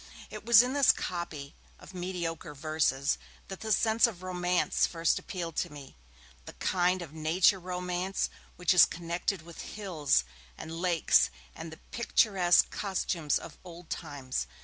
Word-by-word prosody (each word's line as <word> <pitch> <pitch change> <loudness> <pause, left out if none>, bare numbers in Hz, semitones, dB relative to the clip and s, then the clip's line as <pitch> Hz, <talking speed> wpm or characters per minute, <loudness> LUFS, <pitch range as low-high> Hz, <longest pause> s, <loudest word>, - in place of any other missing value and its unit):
It - - -8
was 235 -1 +8
in 250 +1 -2
this 280 -2 +6
copy 160 -5 -5 0.2
of - - -14
mediocre 170 -4 -4
verses 145 -2 0 0.3
that 195 - -7
the 220 - -4
sense 220 +3 +4
of 185 -6 -8
romance 180 -1 +1
first 165 -1 0
appealed 170 -4 -6
to 175 - -1
me, 145 -2 -11 0.5
the - - -9
kind 180 0 0
of 155 -3 -11
nature 165 +5 +3
romance 180 +1 -2 0.3
which 180 +1 +2
is 180 - +8
connected 170 +1 -3
with 170 0 -10
hills, 165 - 0 0.3
and 160 - -8
lakes, 175 -3 +3 0.2
and 160 0 -8
the 160 - -10
picturesque 195 -6 +3
costumes 180 -6 -1
of - - -10
old 175 -1 -12
times. 145 -5 -4
175 Hz, 150 wpm, -29 LUFS, 160-185 Hz, 0.5 s, was